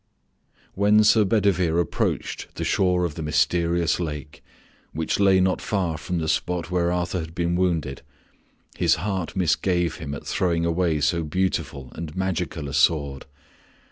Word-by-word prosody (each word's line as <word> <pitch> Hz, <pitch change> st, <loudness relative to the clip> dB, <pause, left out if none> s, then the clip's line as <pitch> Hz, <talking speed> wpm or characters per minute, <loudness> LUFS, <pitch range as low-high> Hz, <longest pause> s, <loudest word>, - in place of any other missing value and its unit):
When 105 Hz, +2 st, +4 dB
Sir 105 Hz, 0 st, +5 dB
Bedivere 95 Hz, -5 st, +2 dB
approached 85 Hz, -, -2 dB
the -, -, -3 dB
shore 90 Hz, -2 st, +2 dB
of 85 Hz, -, -3 dB
the 80 Hz, -, -7 dB
mysterious 85 Hz, +2 st, +1 dB
lake, 75 Hz, -3 st, -6 dB, 0.5 s
which 80 Hz, +4 st, -1 dB
lay 95 Hz, -2 st, +5 dB
not 95 Hz, 0 st, +1 dB
far 90 Hz, -6 st, -1 dB
from 90 Hz, +3 st, -4 dB
the 80 Hz, -1 st, -2 dB
spot 90 Hz, +2 st, -1 dB
where 85 Hz, -1 st, +1 dB
Arthur 90 Hz, +1 st, -1 dB
had 80 Hz, 0 st, -7 dB
been 85 Hz, 0 st, 0 dB
wounded, 85 Hz, -7 st, -1 dB, 0.7 s
his -, -, +3 dB
heart 95 Hz, -1 st, -3 dB
misgave 90 Hz, -1 st, +1 dB
him 70 Hz, -2 st, -5 dB
at -, -, -9 dB
throwing 85 Hz, -2 st, 0 dB
away 85 Hz, -2 st, +1 dB
so 85 Hz, +3 st, +1 dB
beautiful 75 Hz, -6 st, -2 dB
and 80 Hz, -1 st, -7 dB
magical 90 Hz, -5 st, -2 dB
a 70 Hz, -, -6 dB
sword. 70 Hz, -2 st, +1 dB
85 Hz, 150 wpm, -24 LUFS, 80-90 Hz, 0.7 s, Sir